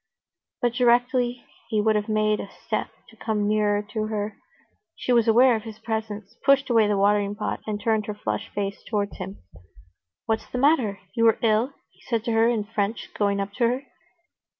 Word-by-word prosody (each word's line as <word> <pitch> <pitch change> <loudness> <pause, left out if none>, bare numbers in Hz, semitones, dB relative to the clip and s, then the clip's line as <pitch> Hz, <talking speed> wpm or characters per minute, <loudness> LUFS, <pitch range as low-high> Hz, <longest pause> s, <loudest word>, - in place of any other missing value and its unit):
But, 240 -1 +2
directly 245 0 +2 0.2
he 220 -2 +1
would 215 +1 +3
have 210 +1 -1
made 215 0 +2
a 200 - -6 0.2
step - - -1 0.2
to - - -18
come 210 -2 -1
nearer 210 -1 +2
to 215 -1 -1
her, 210 -1 -3 0.6
she 250 - -1
was 235 -2 +4
aware 240 +2 +6
of 220 - -3
his 220 -1 -9
presence, 220 -2 -4
pushed 275 -1 +4
away 225 -3 +5
the 205 -1 +1
watering 205 0 +2
pot, 210 - -3
and 210 -1 -2
turned 215 0 0
her 210 - -4
flushed 105 - -3
face 200 -1 -4
towards 205 -2 -2
him. 95 -1 -8 0.8
"What's 220 0 -1
the - - -4
matter? 250 -7 +2
You 230 -2 +3
are 225 - +4
ill?" 225 +4 +2 0.2
he - - -27
said 230 -3 -2
to 230 - -1
her 225 +1 +4
in 225 -3 0
French, 210 +1 -3
going 200 -1 +1
up 200 0 -3
to 240 -2 +3
her. 250 +3 -1
220 Hz, 195 wpm, -25 LUFS, 205-235 Hz, 0.8 s, aware